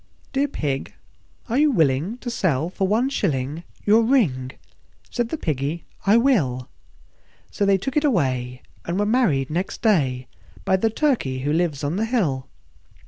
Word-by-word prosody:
III. - - -36
"Dear 280 +1 +2
Pig, 140 - -3 0.5
are 245 +3 +1
you 305 0 +5
willing 160 - +1
to 240 - -4
sell 165 - 0
for 190 0 -1
one 225 +6 +2
shilling 155 - -2 0.2
Your 215 +2 +5
ring?" 190 - +2 0.6
Said 240 -2 -1
the 320 - -3
Piggy, 155 - -2 0.2
"I 210 +3 +6
will." 155 - +1 0.8
So 200 - 0
they 195 -1 +5
took 260 +8 -4
it 300 - +3
away, 130 - 0 0.2
and 170 +2 -3
were 205 - +1
married 200 - +2
next 180 +8 -3
day 135 - +2 0.4
By 190 - +3
the 225 +4 +1
Turkey 220 - 0
who 145 +3 0
lives 160 -4 0
on 145 +6 -1
the 220 - +1
hill. 175 - -1
180 Hz, 165 wpm, -23 LUFS, -, 0.8 s, I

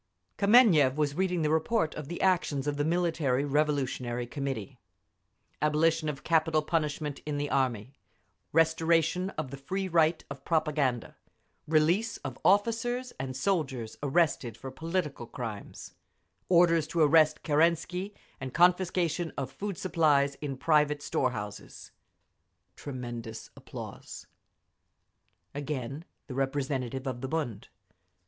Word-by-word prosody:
Kameniev 200 - +5
was 150 -2 0
reading 180 0 0
the 150 - +1
report 160 +2 +1
of 150 -2 -7
the 170 +3 -5
actions 175 -7 +1
of 145 -1 -1
the 145 - +1
Military 160 -5 +1
Revolutionary 135 -5 0
Committee; 135 -2 -5 0.8
abolition 155 +1 +2
of 140 -2 -6
capital 160 -1 +2
punishment 150 -3 -2
in 150 -1 -3
the 145 0 -2
Army, 130 -2 0 0.6
restoration 165 +3 +2
of 150 -4 -3
the 140 - -6
free 190 +8 -3
right 165 -2 +2
of 140 -1 -9
propaganda, 150 -7 0 0.5
release 170 +9 +2
of 130 -1 -6
officers 230 +5 +1
and 130 0 -4
soldiers 135 - -1
arrested 140 -6 +1
for 130 +2 -8
political 160 -4 -3
crimes, 115 -4 -7 0.6
orders 170 -3 +4
to 165 +1 -1
arrest 155 0 +4
Kerensky 170 +5 +1 0.2
and 130 -1 -6
confiscation 175 -1 +2
of 135 -1 -3
food 200 +6 -5
supplies 150 -6 +2
in 140 -3 -4
private 150 0 +2
store 130 - +1
houses…. 105 -4 -8 0.8
Tremendous 120 -4 -7
applause. - - -9 1.3
Again 145 +1 -4 0.2
the 130 - -8
representative 135 -1 -2
of 125 -2 -4
the 130 - -4
_Bund. 135 -10 -3
150 Hz, 120 wpm, -29 LUFS, 135-170 Hz, 1.3 s, Kameniev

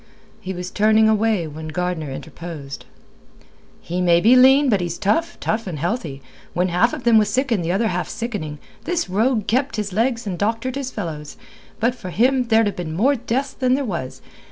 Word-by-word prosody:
He 185 - -6
was 180 0 -5
turning 215 +1 +4
away 215 -4 +2
when 155 +1 -7
Gardner 165 -1 -3
interposed. 150 -1 -8 1.0
"He 180 +2 -3
maybe 180 +7 +5
lean, 265 +3 +6
but 205 -7 +2
he's 170 -1 -3
tough; 325 - 0
tough 220 -1 -2
and 170 -4 -4
healthy. 160 - -3 0.3
When 180 +2 +1
half 180 +7 +3
of 290 -5 -5
them 230 -2 +5
was 210 -1 +1
sick 260 +4 0
and 200 -7 +1
the 165 - -1
other 215 +4 +1
half 180 -1 -2
sickening, 205 -11 -4 0.3
this 345 - -1
rogue 220 +2 +1
kept 260 +6 0
his 210 -3 -3
legs 230 +2 0
and 185 -4 -4
doctored 225 +5 -1
his 275 -1 -4
fellows. 160 - -6 0.4
But 235 +2 +2
for 185 -7 -8
him 250 +7 +2
there'd 225 -1 +4
ha' - - -7
been 165 -3 -5
more 255 +11 +3
deaths 260 +3 -2
than 255 -1 +1
there 280 0 -1
was. 170 - -5
210 Hz, 195 wpm, -21 LUFS, 175-245 Hz, 1.0 s, lean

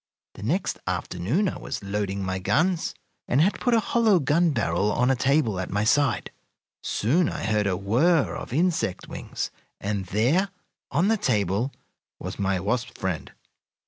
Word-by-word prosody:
The - - -12
next 165 - -1
afternoon 120 - 0
I - - -3
was - - -5
loading 100 -1 -2
my 95 0 -2
guns, 170 - +1 0.3
and 130 - +2
had 185 +7 +3
put 245 -2 +2
a - - +5
hollow 220 -2 +3
gun 165 +4 +3
barrel 100 - +1
on 125 +4 +2
a - - +3
table 130 -6 +2
at 95 - -3
my 105 +2 0
side. 140 +1 +2 0.5
Soon 155 - +1
I - - -5
heard 105 -1 +1
a 95 -2 0
whir 130 - +2
of - - -7
insect 160 - 0
wings, - - -5 0.3
and 100 -2 -2
there, 130 - +2 0.4
on 185 +5 +2
the 225 - +3
table, 105 - 0 0.5
was - - -7
my 95 -1 +1
wasp 120 +6 -2
friend. 90 -4 -3
120 Hz, 165 wpm, -25 LUFS, 100-165 Hz, 0.5 s, a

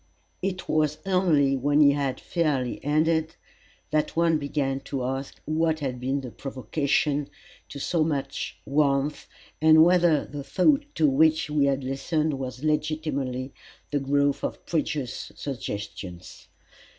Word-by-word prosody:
It 185 -1 -3
was 150 -1 +1
only 165 -8 +3
when 145 +3 +2
he 145 -2 +7
had 140 -2 -1
fairly 145 -8 -1
ended 160 +2 +1 0.6
that 155 0 0
one 165 -1 +3
began 140 -2 -1
to 135 -1 -4
ask 135 +2 -4
what 160 0 +1
had 130 -4 -3
been 135 +3 -1
the 125 -3 -7
provocation 140 +3 -1 0.4
to - - -8
so 160 +3 +1
much 145 -4 -3
warmth, 140 0 +1 0.3
and 160 0 +7
whether 175 -4 +4
the 145 -1 -7
thought 280 - +2
to 155 - +4
which 155 +2 +3
we 150 -2 +3
had 140 -1 0
listened 150 +4 -1
was 130 0 -6
legitimately 150 -4 -1 0.4
the 145 - +1
growth 140 +1 +1
of - - -4
previous 150 -5 -2
suggestions. 100 -8 -7
145 Hz, 135 wpm, -26 LUFS, 135-155 Hz, 0.6 s, he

